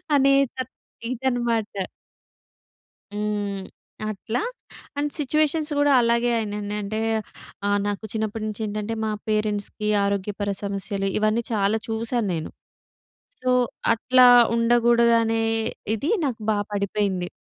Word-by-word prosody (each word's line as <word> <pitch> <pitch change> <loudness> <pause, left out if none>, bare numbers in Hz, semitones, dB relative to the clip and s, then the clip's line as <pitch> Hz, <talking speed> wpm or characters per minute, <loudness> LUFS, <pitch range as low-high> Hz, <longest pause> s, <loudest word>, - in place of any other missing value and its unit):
అనే 275 0 +5 0.2
త - - -36 0.5
ఇదన్నమాట. 240 -5 -1 1.3
హ్మ్. 205 -2 -2 0.5
అట్లా 220 +4 -3 0.6
అండ్ 290 0 -1
సిట్యుయేషన్స్ 305 +2 +1
కూడా 290 0 +4
అలాగే 235 +1 +2
అయినాయండి. 210 -1 -3
అంటే 215 +2 -3 0.7
ఆహ్, 205 0 +3
నాకు 205 +1 -3
చిన్నప్పటినుంచి 215 0 -3
ఏంటంటే 210 +1 -3
మా 215 - -1 0.2
పేరెంట్స్‌కి 210 0 -1 0.2
ఆరోగ్యపర 200 +1 -2
సమస్యలు 200 0 -2
ఇవన్నీ 215 +2 +1
చాలా 210 0 +2
చూశాను 225 0 -1
నేను. 160 -1 -3 0.9
సో, 255 - 0 0.4
అట్లా 250 +3 +5 0.3
ఉండకూడదనే 235 -1 +3 0.5
ఇది 285 - -2
నాకు 250 -5 -2
బా 210 - +2 0.2
పడిపోయింది. 200 -2 -1
220 Hz, 105 wpm, -24 LUFS, 205-235 Hz, 1.3 s, అనే